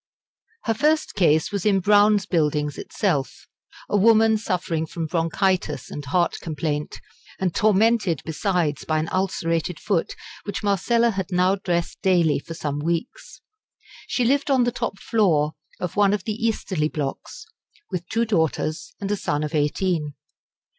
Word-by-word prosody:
Her 225 - +1
first 305 +7 +1
case 160 -4 +2
was 200 -3 -2
in 200 -2 +3
Brown's 205 +1 +4
Buildings 150 -5 0
itself 170 -11 -2 0.4
a - - -1
woman 220 +2 +5
suffering 180 -6 -2
from 165 +1 -4
bronchitis 175 +3 -1
and 145 - -6
heart 170 +5 +1
complaint, 150 -2 -3 0.4
and 185 -3 0
tormented 215 -3 +2
besides 165 -2 -1
by 155 - 0
an 155 +1 -1
ulcerated 170 -3 -1
foot 195 -6 -1 0.3
which 205 +1 -5
Marcella 230 +4 +2
had 190 -4 -3
now 180 +1 +3
dressed 175 -4 -2
daily 175 -6 +3
for 165 +3 -9
some 145 -2 -3
weeks. 170 - -4 0.7
She 245 - 0
lived 280 +4 +2
on 265 -3 +4
the 240 - +1
top 215 - -3
floor 165 -9 +2 0.3
of 180 - -4
one 200 -1 +4
of 210 - -6
the 215 - -2
easterly 210 -8 -1
blocks, 145 -3 -5 0.5
with 175 -1 -4
two 230 +1 +1
daughters 160 -5 -1
and 200 0 -3
a - - +2
son 150 -6 -2
of 150 - -4
eighteen. 150 0 0
180 Hz, 150 wpm, -23 LUFS, 160-210 Hz, 0.7 s, woman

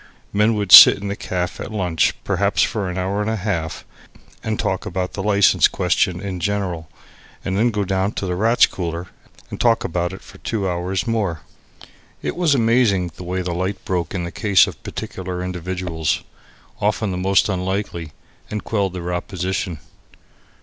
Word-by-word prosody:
Men 105 +2 +3
would 100 -3 -2
sit - - +12
in 100 0 -5
the 100 - -2
caff 90 -3 -3
at - - -6
lunch 90 -6 +1
perhaps - - +1
for 100 -4 -1
an 90 - -5
hour 95 +3 -1
and 105 - -1
a 110 - 0
half 90 -6 -3 0.6
and 110 -1 -2
talk 95 - -2
about 90 0 -3
the 95 - -4
license 100 -1 +4
question 90 -1 0
in 95 -2 -5
general, 90 -4 -2 0.6
and 95 - -1
then 115 +4 +3
go 105 -3 -1
down 95 0 0
into 100 - -4
the 90 - -2
Rats' 110 +6 +4
Cooler 85 -1 -5 0.4
and - - -5
talk 115 -1 +3
about 85 +1 -2
it 95 - -10
for - - -15
two 105 -4 -2
hours 90 +2 -2
more. 105 -9 -1 0.8
It - - -2
was 170 -5 +2
amazing 115 -7 +2
the - - -9
way 90 +1 -3
the 90 -1 -3
light 95 +3 -3
broke 90 0 -2
in 90 - -1
in - - -3
the 85 - -6
case 100 -3 +4
of - - -9
particular 90 -1 -5
individuals, 90 -4 -2 0.6
often 105 - 0
the - - -3
most 95 +2 +2
unlikely, 95 -4 -3 0.4
and 105 -1 -4
quelled 100 -4 -1
their 90 -1 -4
opposition. 90 0 -3
95 Hz, 180 wpm, -21 LUFS, 90-105 Hz, 0.8 s, sit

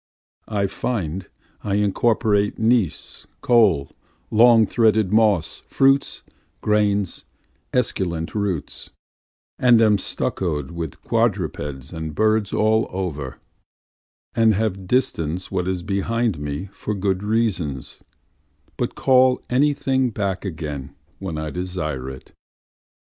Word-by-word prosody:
I 100 -2 0
find 95 -4 -3 0.3
I 100 -1 -1
incorporate 105 0 +1
gneiss, 110 -5 0
coal, 100 - +3 0.4
long 115 0 +6
threaded 110 -3 +2
moss, 105 -7 +2
fruits, 135 +1 +2 0.4
grains, 105 -2 +1 0.5
esculent 90 -9 -1
roots, 100 -8 -3 0.7
And 120 -2 +6
am 110 -2 +5
stuccoâd 80 -6 -2
with 85 -3 -6
quadrupeds 85 - -1
and 80 -2 -5
birds 110 -1 +2
all 110 +1 +2
over, 75 -8 -4 1.0
And 115 -2 +4
have 95 -3 -2
distanced 90 - 0
what 90 -2 -1
is 95 -2 -2
behind 105 0 -1
me 75 +6 -4
for 105 - -4
good 95 -1 -1
reasons, 100 - -2 0.8
But - - -2
call 130 -1 +4
any 140 +4 +4
thing 130 -2 0
back 100 -4 -3
again 75 -7 -6 0.2
when 95 -5 -4
I 75 -1 -4
desire 85 -8 -4
it. 65 0 -11
100 Hz, 110 wpm, -22 LUFS, 85-110 Hz, 1.0 s, long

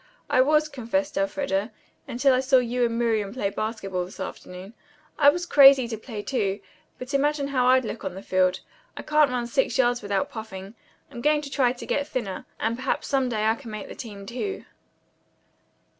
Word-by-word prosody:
"I 255 - +5
was," 305 +3 +3
confessed 285 +2 -2
Elfreda, 275 -8 -1 0.4
"until 265 +3 +2
I 255 - +3
saw 265 0 +4
you 250 0 0
and 230 0 -2
Miriam 220 -4 0
play 200 -6 -1
basketball 195 -4 -3
this 180 - -11
afternoon. 185 +4 -8 0.5
I 285 -1 +8
was 350 +4 -1
crazy 275 -5 +7
to 225 - -3
play, 220 -1 -7
too. 205 -6 -1 0.4
But 255 +2 -8
imagine 285 0 +1
how 255 -3 +1
I'd 255 0 +4
look 220 - -6
on 190 -2 -4
the 195 - -8
field. 185 -1 +1 0.4
I - - -6
couldn't 300 -1 +3
run 250 -1 -2
six 265 +4 0
yards 245 -2 +2
without 200 -2 -1
puffing. 200 -3 -8 0.4
I'm 235 - -8
going 300 +2 +3
to 280 - -8
try 255 -4 +2
to 250 - -9
get 285 0 -1
thinner, 215 -10 -4
and 225 +1 0
perhaps 260 - -2
some 270 -2 +1
day 215 -2 -1
I 220 - +4
can 235 0 -10
make 215 -2 -7
the - - -7
team, 205 -5 -9
too." 255 - -5
245 Hz, 195 wpm, -25 LUFS, 210-275 Hz, 0.5 s, I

